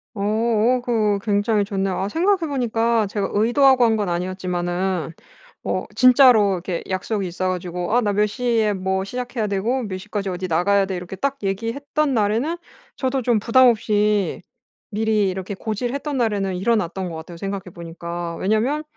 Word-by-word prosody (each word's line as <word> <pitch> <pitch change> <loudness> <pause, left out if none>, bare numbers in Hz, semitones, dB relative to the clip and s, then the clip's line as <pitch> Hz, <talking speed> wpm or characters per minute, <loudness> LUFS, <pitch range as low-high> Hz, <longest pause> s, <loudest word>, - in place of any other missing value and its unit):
어어 220 +4 +1
그 245 - -4 0.2
어 - - -3
굉장히 205 0 +1
좋네요. 195 -2 -2
아 195 - -1
생각해 360 - +1
보니까 230 -5 +1
제가 200 0 -2
의도하고 250 +4 +4
한 225 -2 +3
건 205 -3 -1
아니었지만은 180 -1 -2 0.5
어 - - -2
진짜로 250 -5 +6
이렇게 180 -1 -4
약속이 195 +1 -2
있어 185 +2 -2
가지고 180 +2 -3
"아 245 - +4
나 205 -3 0
몇 210 +1 +2
시에 220 -1 0
뭐 190 0 -1
시작해야 245 +1 -3
되고 215 +6 -1
몇 195 -4 -4
시까지 200 0 -4
어디 185 +1 -4
나가야 195 +4 +2
돼." 190 -1 -4
이렇게 180 +2 -7
딱 275 +8 -2
얘기했던 250 +9 -1
날에는 230 +9 0 0.4
저도 260 -2 -1
좀 235 -2 +2
부담 250 +4 +5
없이 210 -5 +1 0.5
미리 215 -2 +1
이렇게 190 +1 -5
고지를 230 +5 -3
했던 280 0 -3
날에는 200 -5 0
일어났던 190 -3 0
것 165 - -7
같아요, 165 +1 -9
생각해 195 +1 -4
보니까. 170 0 -6
왜냐하면 225 - 0
205 Hz, 370 characters per minute, -21 LUFS, 190-235 Hz, 0.5 s, 진짜로